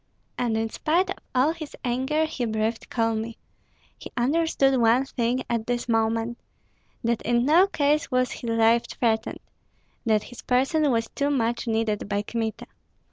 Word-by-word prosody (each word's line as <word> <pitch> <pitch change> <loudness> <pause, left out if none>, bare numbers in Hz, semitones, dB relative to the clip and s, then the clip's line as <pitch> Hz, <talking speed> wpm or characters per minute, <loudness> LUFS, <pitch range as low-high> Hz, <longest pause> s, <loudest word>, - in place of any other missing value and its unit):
And 230 -3 0
in 225 0 0
spite 345 +5 +1
of - - -4 0.2
all 260 +5 +4
his 315 -3 -8
anger 265 +6 +1
he 285 -6 -3
breathed 220 +1 -2
calmly; 225 -1 -1 0.6
he - - -10
understood 270 -1 +2
one 235 +4 +4
thing 250 -1 -1
at 230 -2 -2
this 245 0 -1
moment, 225 +1 0 0.6
that 235 0 0
in 240 +1 +1
no 335 +7 +5
case 300 -3 +1
was 255 -1 +1
his 235 - -5
life 230 +1 +3
threatened, 220 -2 -1 0.7
that 215 -2 +3
his 245 - -11
person 270 +4 +2
was 230 -2 +1
too 285 0 -1
much 235 -4 0
needed 220 -2 -1
by 205 0 0
Kmita. 225 0 -3
240 Hz, 155 wpm, -25 LUFS, 225-270 Hz, 0.7 s, no